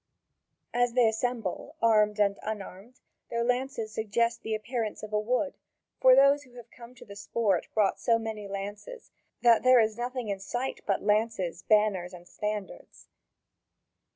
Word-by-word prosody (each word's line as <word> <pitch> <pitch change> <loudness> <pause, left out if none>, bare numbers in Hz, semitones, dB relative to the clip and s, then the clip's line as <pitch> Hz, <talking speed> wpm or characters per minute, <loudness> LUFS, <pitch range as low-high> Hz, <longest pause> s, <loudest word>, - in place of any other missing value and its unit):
As 245 0 +1
they 245 -2 +4
assemble, 225 -3 -3
armed 215 -2 +3
and 200 -1 +2
unarmed, 210 +2 -7 0.3
their 235 0 -1
lances 250 -2 -2
suggest 230 +2 0
the 220 - -2
appearance 220 -1 -4
of 215 0 -8
a 210 - +2
wood, 250 +7 -1 0.4
for 255 0 +7
those 275 +2 +5
who 255 -4 -19
have 240 -1 -13
come 240 +1 -13
to - - -14
the 200 - -11
sport 200 -2 -1
brought 210 -3 +2
so 230 -2 +3
many 220 -2 -5
lances 205 - -7 0.3
that 235 -2 +6
there 255 -1 +6
is 220 0 +1
nothing 245 -2 -3
in 200 -1 -2
sight 245 +7 -4
but 195 - 0
lances, 210 -5 0
banners, 205 -4 +2
and 175 0 -14
standards. 210 0 -6
220 Hz, 155 wpm, -28 LUFS, 210-245 Hz, 0.4 s, for